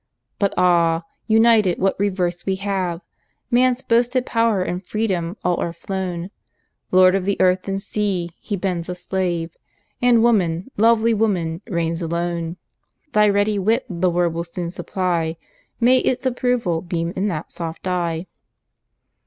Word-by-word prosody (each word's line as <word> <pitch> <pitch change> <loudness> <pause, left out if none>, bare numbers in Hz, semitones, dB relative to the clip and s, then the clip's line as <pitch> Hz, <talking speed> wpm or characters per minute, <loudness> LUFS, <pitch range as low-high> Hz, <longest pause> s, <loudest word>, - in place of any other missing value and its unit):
But 200 -1 +1
ah! 170 -2 +3 0.2
united, 220 -4 +4
what 195 0 +1
reverse 185 -3 -1
we 190 - 0
have! 190 -3 -2 0.5
Man's 250 +1 +3
boasted 245 +2 +2
power 230 -4 +1
and 180 +1 -4
freedom, 190 -3 -2
all 180 -1 +1
are 170 - -2
flown; 180 0 -4 0.6
Lord 185 0 +6
of 195 -1 +1
the 200 +1 -1
earth 185 0 +2
and 195 0 -1
sea, 195 -4 -2
he 205 - -3
bends 180 -3 -2
a 180 - -3
slave, 175 -3 -2 0.5
And 240 -2 +5
woman, 190 -3 +1
lovely 230 +1 +4
woman, 185 -6 0
reigns 170 -4 -1
alone. 170 0 -2 0.6
Thy 210 0 +5
ready 205 +1 +1
wit 225 +6 +1
the 180 -3 0
word 175 -1 +1
will 170 +1 -2
soon 170 0 -5
supply, 175 -3 -2 0.4
May 250 +2 +5
its 255 +1 -1
approval 245 -9 0
beam 170 -1 -3
in 195 +2 0
that 165 -5 -4
soft 165 0 -6
eye! 170 -2 -1
185 Hz, 145 wpm, -21 LUFS, 170-210 Hz, 0.6 s, Lord